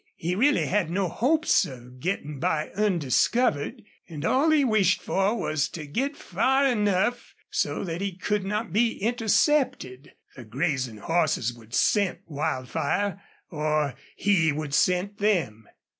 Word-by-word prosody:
He 170 Hz, +2 st, -2 dB
really 270 Hz, +10 st, +3 dB
had 195 Hz, -4 st, 0 dB
no 185 Hz, +2 st, 0 dB
hopes 300 Hz, -, +2 dB
of 125 Hz, -1 st, -10 dB
getting 150 Hz, -4 st, -3 dB
by 155 Hz, +3 st, -1 dB
undiscovered, 205 Hz, -, +1 dB, 0.3 s
and 155 Hz, -1 st, -6 dB
all 275 Hz, -, +3 dB
he 305 Hz, -3 st, +4 dB
wished 210 Hz, -6 st, +3 dB
for 195 Hz, +4 st, 0 dB
was 155 Hz, -7 st, -1 dB
to 155 Hz, -3 st, -7 dB
get 265 Hz, -, -2 dB
far 265 Hz, +9 st, +1 dB
enough 215 Hz, -1 st, 0 dB, 0.2 s
so -, -, -1 dB
that 170 Hz, -1 st, -4 dB
he 195 Hz, -3 st, -3 dB
could 205 Hz, +1 st, -1 dB
not 210 Hz, -1 st, -3 dB
be 230 Hz, +2 st, +2 dB
intercepted. 225 Hz, -, 0 dB, 0.2 s
The 130 Hz, -, -10 dB
grazing 130 Hz, -1 st, -2 dB
horses 150 Hz, -4 st, 0 dB
would 115 Hz, 0 st, -10 dB
scent 200 Hz, -3 st, +2 dB
Wildfire 150 Hz, +7 st, -2 dB, 0.3 s
or 150 Hz, -3 st, 0 dB, 0.2 s
he 180 Hz, -6 st, +2 dB
would 145 Hz, -1 st, -4 dB
scent 185 Hz, +6 st, +1 dB
them. 165 Hz, -, 0 dB
180 Hz, 140 wpm, -26 LUFS, 145-215 Hz, 0.3 s, he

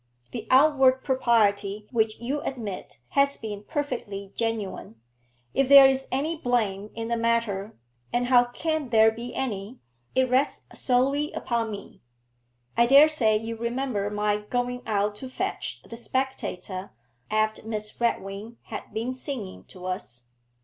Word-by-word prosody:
The -, -, -6 dB
outward 265 Hz, -1 st, +5 dB
propriety 215 Hz, -6 st, +2 dB
which 220 Hz, -3 st, +1 dB
you 270 Hz, +5 st, -2 dB
admit 215 Hz, -, -5 dB
has 280 Hz, 0 st, +2 dB
been 210 Hz, -2 st, -6 dB
perfectly 220 Hz, -, -4 dB
genuine; 215 Hz, -, -3 dB, 0.5 s
if 275 Hz, -1 st, +2 dB
there 280 Hz, -1 st, +11 dB
is 270 Hz, 0 st, +2 dB
any 295 Hz, +6 st, 0 dB
blame 215 Hz, -8 st, -1 dB
in 225 Hz, 0 st, -4 dB
the 235 Hz, -, 0 dB
matter 230 Hz, -3 st, 0 dB, 0.3 s
and 245 Hz, 0 st, +1 dB
how 245 Hz, -1 st, +5 dB
can 310 Hz, +3 st, -2 dB
there 220 Hz, -1 st, +6 dB
be 235 Hz, +2 st, -7 dB
any? 220 Hz, -2 st, -3 dB, 0.4 s
it 260 Hz, 0 st, +3 dB
rests 255 Hz, +3 st, +1 dB
solely 275 Hz, +4 st, +1 dB
upon 230 Hz, -2 st, -1 dB
me. 205 Hz, -2 st, -9 dB, 0.7 s
I 235 Hz, 0 st, +4 dB
dare 280 Hz, +4 st, +8 dB
say 225 Hz, -8 st, +3 dB
you 225 Hz, +1 st, -5 dB
remember 235 Hz, -3 st, -2 dB
my 210 Hz, 0 st, 0 dB
going 245 Hz, +4 st, -2 dB
out 205 Hz, -1 st, +1 dB
to 260 Hz, +3 st, -7 dB
fetch 380 Hz, +9 st, -4 dB
the 230 Hz, -, -10 dB
"Spectator," 215 Hz, -7 st, -3 dB, 0.4 s
after 215 Hz, 0 st, 0 dB
Miss 215 Hz, 0 st, -4 dB
Redwing 215 Hz, 0 st, -2 dB
had 220 Hz, -, -8 dB
been 230 Hz, +4 st, -2 dB
singing 255 Hz, -7 st, -6 dB
to 180 Hz, -1 st, -12 dB
us. 120 Hz, -10 st, -5 dB
230 Hz, 140 wpm, -26 LUFS, 210-260 Hz, 0.7 s, there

